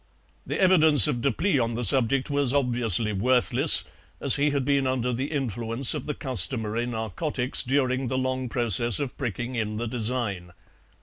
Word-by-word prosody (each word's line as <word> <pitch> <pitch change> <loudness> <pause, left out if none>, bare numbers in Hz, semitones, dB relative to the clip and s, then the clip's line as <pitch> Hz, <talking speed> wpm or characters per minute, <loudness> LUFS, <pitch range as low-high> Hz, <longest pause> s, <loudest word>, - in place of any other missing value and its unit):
The - - -4
evidence 160 - +5
of 120 - -3
Deplis 140 - 0
on 115 0 -3
the 120 - -4
subject 130 +5 +3
was 140 -2 +1
obviously 120 -5 0
worthless, 125 +5 +3 0.4
as - - +2
he 145 +1 +1
had 140 -2 -2
been 140 -1 0
under 125 -1 -2
the 130 +5 -4
influence 120 -2 0
of - - -7
the 150 - -4
customary 120 -3 +1
narcotics 125 - -3
during 130 -1 -1
the 130 - -3
long 130 -1 -3
process 120 -1 +1
of 140 -3 -5
pricking 120 -1 -5
in 110 -3 -4
the 120 +1 -4
design. 110 -6 -4
125 Hz, 165 wpm, -24 LUFS, 115-135 Hz, 0.4 s, evidence